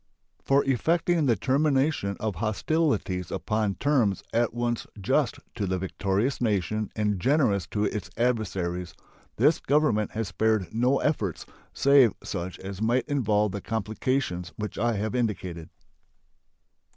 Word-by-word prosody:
For 140 Hz, +1 st, +2 dB
effecting 165 Hz, +4 st, +2 dB
the 120 Hz, -, +4 dB
termination 135 Hz, -4 st, +1 dB
of 105 Hz, -4 st, -2 dB
hostilities 110 Hz, -, 0 dB
upon 105 Hz, -2 st, -1 dB
terms 125 Hz, -9 st, +1 dB
at 120 Hz, 0 st, +2 dB
once 120 Hz, 0 st, -2 dB
just 95 Hz, -, +1 dB, 0.2 s
to 100 Hz, -, -2 dB
the 95 Hz, 0 st, 0 dB
victorious 100 Hz, +7 st, -1 dB
nation 105 Hz, -1 st, 0 dB
and 105 Hz, -3 st, 0 dB
generous 110 Hz, -, +2 dB
to 105 Hz, +1 st, -1 dB
its 105 Hz, -1 st, -3 dB
adversaries, 95 Hz, -7 st, -1 dB, 0.4 s
this -, -, +3 dB
Government 135 Hz, -8 st, +1 dB
has 110 Hz, -3 st, -2 dB
spared 110 Hz, 0 st, 0 dB
no 125 Hz, +4 st, +2 dB
efforts 105 Hz, -, -1 dB, 0.3 s
save 140 Hz, -5 st, +5 dB
such 90 Hz, +1 st, -4 dB
as 95 Hz, +1 st, -7 dB
might 120 Hz, +3 st, +1 dB
involve 105 Hz, -7 st, +1 dB
the 100 Hz, +1 st, -5 dB
complications 110 Hz, -3 st, -2 dB
which 105 Hz, -1 st, -5 dB
I 120 Hz, +2 st, +2 dB
have 110 Hz, +1 st, -2 dB
indicated. 95 Hz, -9 st, -2 dB
110 Hz, 130 wpm, -27 LUFS, 100-130 Hz, 0.4 s, save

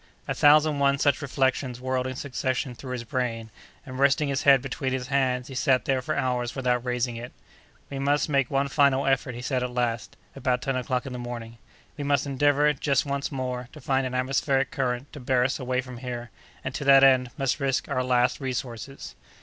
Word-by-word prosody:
A -, -, 0 dB
thousand 150 Hz, 0 st, +5 dB
one 140 Hz, 0 st, +3 dB
such 140 Hz, +1 st, +2 dB
reflections 130 Hz, -2 st, -1 dB
whirled 130 Hz, 0 st, -1 dB
in 130 Hz, -, -5 dB
succession 130 Hz, -1 st, -2 dB
through 125 Hz, +1 st, -7 dB
his 125 Hz, -2 st, -4 dB
brain; 115 Hz, -2 st, -3 dB, 0.3 s
and, 130 Hz, -1 st, -7 dB
resting 140 Hz, +1 st, +3 dB
his 135 Hz, -1 st, 0 dB
head 140 Hz, -1 st, +6 dB
between 135 Hz, 0 st, -3 dB
his 130 Hz, 0 st, -3 dB
hands, 130 Hz, -2 st, +1 dB
he 135 Hz, -, -9 dB
sat 130 Hz, -1 st, +2 dB
there 135 Hz, -1 st, +1 dB
for -, -, -3 dB
hours 125 Hz, -1 st, -1 dB
without 125 Hz, -2 st, 0 dB
raising 125 Hz, -1 st, -1 dB
it. 120 Hz, +1 st, -7 dB, 0.6 s
"We 135 Hz, -, -4 dB
must 145 Hz, +1 st, +1 dB
make 140 Hz, -4 st, +1 dB
one 140 Hz, 0 st, +1 dB
final 140 Hz, -1 st, +3 dB
effort," 135 Hz, -2 st, 0 dB
he 120 Hz, -, -7 dB
said, 130 Hz, -1 st, -1 dB
at 125 Hz, -, -2 dB
last, 120 Hz, -1 st, -2 dB, 0.2 s
about 130 Hz, -2 st, -1 dB
ten 135 Hz, -, -1 dB
o'clock 125 Hz, 0 st, -1 dB
in 130 Hz, -, -6 dB
the 125 Hz, -, -5 dB
morning. 120 Hz, -1 st, -7 dB, 0.4 s
"We 145 Hz, -, -4 dB
must 140 Hz, 0 st, +1 dB
endeavor, 145 Hz, +2 st, +3 dB
just 140 Hz, 0 st, +1 dB
once 140 Hz, +1 st, -2 dB
more, 125 Hz, -2 st, -4 dB
to 155 Hz, -, -11 dB
find 135 Hz, -1 st, 0 dB
an 130 Hz, -, -5 dB
atmospheric 135 Hz, +1 st, +1 dB
current 130 Hz, 0 st, -2 dB
to 150 Hz, -, -8 dB
bear 125 Hz, -1 st, +2 dB
us 135 Hz, +3 st, -1 dB
away 130 Hz, 0 st, -1 dB
from 125 Hz, -2 st, -10 dB
here, 120 Hz, -1 st, -6 dB, 0.3 s
and, 130 Hz, -, -4 dB
to 140 Hz, -, -4 dB
that 135 Hz, 0 st, +7 dB
end, 130 Hz, -2 st, +5 dB
must 135 Hz, -3 st, 0 dB
risk 135 Hz, -2 st, 0 dB
our 130 Hz, -, -1 dB
last 125 Hz, 0 st, +2 dB
resources." 125 Hz, -, -5 dB
130 Hz, 210 wpm, -26 LUFS, 125-140 Hz, 0.6 s, that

